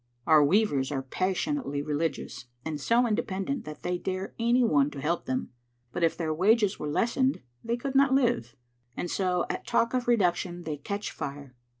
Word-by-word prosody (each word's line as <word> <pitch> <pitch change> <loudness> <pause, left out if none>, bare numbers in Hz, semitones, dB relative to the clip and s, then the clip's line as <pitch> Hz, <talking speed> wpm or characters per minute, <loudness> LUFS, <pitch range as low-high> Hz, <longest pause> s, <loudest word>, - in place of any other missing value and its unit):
Our 155 -2 +6
weavers 145 -5 +2
are 135 -2 -2
passionately 185 - -1
religious, 145 -3 -3 0.2
and 155 -2 -3
so 235 - +3
independent 215 +3 -2
that 150 - -9
they 180 0 -1
dare 190 +2 -4
any 240 +2 +3
one 145 -10 +3
to 145 - -8
help 165 +5 -1
them, 130 0 -2 0.4
but 175 - -2
if 165 - +2
their 160 -2 -1
wages 205 +4 +3
were 150 - -3
lessened 245 - +1 0.2
they 235 +1 -1
could 270 +2 -4
not 275 0 +5
live. 240 - +1 0.4
And 175 - -3
so 180 -2 +1
at - - -5
talk 235 0 +2
of 250 -1 -1
reduction 180 -5 +1
they 155 -2 -4
catch 200 +8 -4
fire. 140 -2 -7
180 Hz, 180 wpm, -28 LUFS, 150-235 Hz, 0.4 s, Our